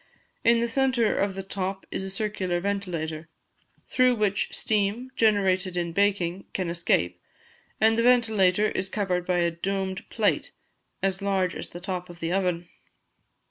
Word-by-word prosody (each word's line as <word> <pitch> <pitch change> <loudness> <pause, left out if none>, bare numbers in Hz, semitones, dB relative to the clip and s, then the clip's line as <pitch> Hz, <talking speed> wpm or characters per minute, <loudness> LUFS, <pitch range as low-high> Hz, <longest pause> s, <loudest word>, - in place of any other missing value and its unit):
In 230 0 +4
the 235 - +1
centre 255 -2 +2
of 200 -1 0
the 195 - -4
top 190 0 -4
is 190 - -2
a 195 - -3
circular 190 -3 -1
ventilator, 170 -5 -3 0.6
through 255 -1 +3
which 210 -2 0
steam, 215 +4 0
generated 190 -5 +2
in 170 -1 -1
baking, 195 -2 +1
can 185 -3 -1
escape, 90 - 0 0.6
and 220 +1 +4
the - - +4
ventilator 220 -5 +4
is 190 +1 -2
covered 185 -4 -1
by 180 -1 +2
a 170 -1 +2
domed 190 +2 -3
plate, - - 0 0.5
as 195 0 0
large 190 -2 +1
as - - -7
the 175 - -8
top 180 -1 -4
of 175 -1 -11
the 165 0 -2
oven. 180 -3 0
190 Hz, 155 wpm, -26 LUFS, 180-210 Hz, 0.6 s, In